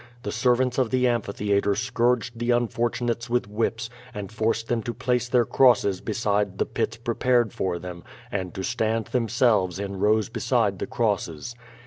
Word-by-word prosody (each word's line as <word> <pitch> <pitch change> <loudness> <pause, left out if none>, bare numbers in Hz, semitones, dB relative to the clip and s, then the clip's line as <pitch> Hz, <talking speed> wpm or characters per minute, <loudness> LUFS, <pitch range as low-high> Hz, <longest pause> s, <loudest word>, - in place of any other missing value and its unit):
The - - -3
servants 125 0 +2
of 125 -3 +2
the 125 0 +2
amphi 120 -4 0
theatre 100 0 +1
scourged 120 +1 0
the 120 +1 -2
unfortunates 120 0 0
with 120 -3 +1
whips, 110 +2 -1 0.3
and 100 -2 -6
forced 115 +1 -1
them 120 -1 0
to 120 +1 -5
place 125 -1 0
their 125 -2 +3
crosses 105 -8 +3
beside 105 -3 -1
the - - +1
pits 115 - -2
prepared 120 -1 +1
for 90 -2 -1
them, 85 0 -8 0.3
and 95 -3 -3
to 95 - -4
stand 115 0 0
themselves 115 -6 +2
in 100 -1 -4
rows 105 +2 +2
beside 115 -4 0
the - - -3
crosses. 105 -3 -1
115 Hz, 165 wpm, -25 LUFS, 100-120 Hz, 0.3 s, their